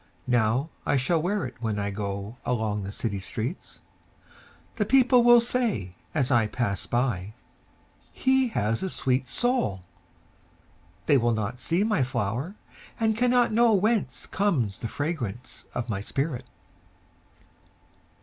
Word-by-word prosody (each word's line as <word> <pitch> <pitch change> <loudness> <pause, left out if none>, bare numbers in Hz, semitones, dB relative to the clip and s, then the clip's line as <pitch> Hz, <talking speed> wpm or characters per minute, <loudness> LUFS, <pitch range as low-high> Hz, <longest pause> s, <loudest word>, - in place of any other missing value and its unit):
Now 125 +5 +1
I - - +2
shall 155 +5 +1
wear 195 +4 -1
itWhen 110 -4 -4
I 100 0 -1
goAlong 105 +2 -3
the 95 - -5
city 100 -2 -3
streets:The 125 - -8
people 255 +1 +5
will 240 0 +8
sayAs 155 - -1
I 115 -3 +4
pass 105 -4 -2
by—"He 125 - -2
has 115 - -1
a 190 - -2
sweet 130 -5 0
soul!"They 130 - -3
will 120 0 +2
not 110 +3 -3
see 170 +8 +1
my 215 -8 +1
flower, 125 - -2 0.4
And 220 -1 +2
cannot 245 +1 +3
knowWhence 215 - +2
comes 145 - 0
the 115 - -3
fragrance 130 - -4
of 120 -1 -2
my 100 -4 -2
spirit! 130 +2 -3
125 Hz, 110 wpm, -26 LUFS, -, 0.4 s, will